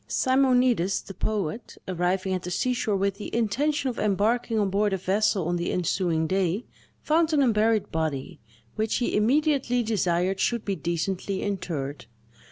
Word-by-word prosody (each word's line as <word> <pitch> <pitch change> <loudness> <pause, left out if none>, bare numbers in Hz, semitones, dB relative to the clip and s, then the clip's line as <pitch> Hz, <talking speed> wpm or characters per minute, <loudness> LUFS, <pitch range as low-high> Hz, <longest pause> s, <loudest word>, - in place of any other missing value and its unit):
Simonides 255 -7 +2
the 195 - -9
poet, 210 +2 -3
arriving 185 +1 0
at 185 - -1
the 180 - -6
seashore 225 +2 0
with 195 0 0
the 210 - -5
intention 270 +6 0
of 245 - -3
embarking 220 +3 +1
on 200 -3 +1
board 205 +1 +1
a - - +1
vessel 190 -1 +1
on 175 0 0
the 170 - -2
ensuing 170 -2 0
day, 190 +4 0 0.4
found 320 +1 +2
an 290 -2 +4
unburied 220 -3 +2
body, 155 -4 -3 0.4
which 220 0 0
he 245 - 0
immediately 255 +1 +2
desired 190 -3 0
should 235 +1 0
be 200 - -1
decently 185 +3 -2
interred. 150 - -4
200 Hz, 155 wpm, -26 LUFS, 180-235 Hz, 0.4 s, an